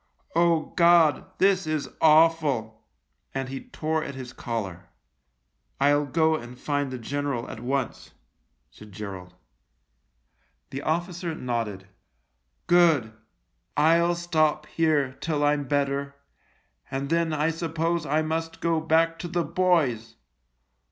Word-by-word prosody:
Oh, 170 -2 +2
God, 170 -4 +5
this 190 -3 +3
is 155 -2 -1
awful! 150 -9 +3 0.2
" - - -41
and 135 -1 -2
he 135 - -7
tore 160 -7 -1
at 140 - -6
his 130 -1 -8
collar. 95 -7 -5 0.9
"I'll 145 +1 +3
go 160 +3 +2
and 125 -4 -8
find 145 0 -1
the 130 - -5
general 140 0 -3
at - - -8
once/' 130 +1 -3 0.6
said 105 +12 -14
Gerald. 95 -3 -8 1.4
The 135 - -4
officer 170 +1 -2
nodded. 115 -8 -3 0.4
" - - -48
Good. 165 -10 +4 0.6
I'll 170 +3 +4
stop 155 -3 +1
here 155 -5 +1
till 150 -3 -1
I'm 145 -1 +2
better, 140 0 -1 0.7
and 135 +2 -4
then 165 -1 +2
I 155 +1 +1
suppose 165 0 -1
I 155 +1 +1
must 165 +1 -3
go 165 -1 +1
back 165 +1 +2
to 175 - -4
the 175 0 -1
boys. 150 -10 +1
150 Hz, 125 wpm, -26 LUFS, 130-165 Hz, 1.4 s, God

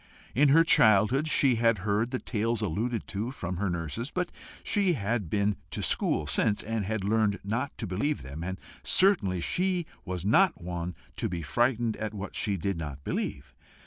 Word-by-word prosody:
In 140 +6 +4
her 160 +4 +7
childhood 110 +1 +4
she 135 -5 +4
had 115 -1 +3
heard 105 +3 +1
the 130 - -2
tales 115 -1 -1
alluded 110 +4 -1
to 105 +4 -3
from 90 -9 -5
her 100 +1 0
nurses, 85 - -3
but 180 +1 -2 0.3
she 195 -4 +2
had 110 - -2
been 100 +2 +1
to - - -4
school - - +1
since, 105 - +1
and 110 -2 -2
had 110 0 -2
learned 105 0 +2
not 115 +7 -2
to 115 - -4
believe 110 +11 -1
them; 70 +5 -7
and 95 +1 -4 0.2
certainly 110 - +3
she 180 - 0 0.2
was 90 -2 -5
not 180 - +4
one 85 0 -4 0.2
to - - -1
be 85 -2 -4
frightened 120 - +1
at 110 0 -4
what 95 -1 -6
she 100 -3 0
did 95 0 -2
not 70 -3 -6
believe. 70 0 -3
105 Hz, 180 wpm, -28 LUFS, 95-125 Hz, 0.3 s, her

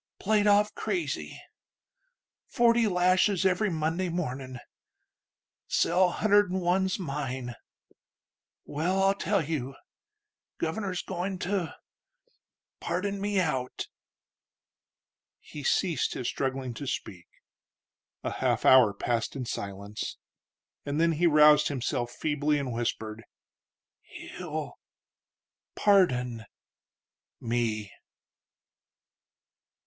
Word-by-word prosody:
played 210 0 +2
off 205 +1 +4
crazy.... 355 -3 -3 1.1
Forty 235 -2 +3
lashes 185 +1 +3
every 190 +3 +2
Monday... 165 +2 -1
mornin'.... 130 -7 -4 1.1
Cell 180 +2 +3
hunder'd'n 205 -1 +2
one's 185 +1 +1
mine.... 135 - -4 1.1
Well, 180 +6 0
I'll 195 0 +4
tell 200 -3 0
you: 135 -4 -3 0.8
Governor's 180 +2 -2
goin' 185 +1 -3
to... 185 -3 -2 1.0
pardon 200 +2 -2
me 205 -1 +1
out." 130 -8 -2 1.5
He 150 - -10
ceased 170 +4 +1
his 125 - -3
struggling 130 -2 -2
to 135 +5 -7
speak. 90 -7 -5 1.0
A - - -2
half - - 0
hour 120 -6 +7
passed 115 +4 -1
in 130 -2 -4
silence, 100 -1 -5 0.7
and 145 +2 -2
then 165 0 +4
he 170 +2 +2
roused 150 -1 +6
himself 125 -3 -2
feebly 150 +3 0
and 135 -4 -3
whispered: 115 -2 -3 0.8
"He'll... - - -7 1.0
pardon... 125 - +2 0.9
me." 115 -3 -1
155 Hz, 90 wpm, -28 LUFS, 125-190 Hz, 1.5 s, hour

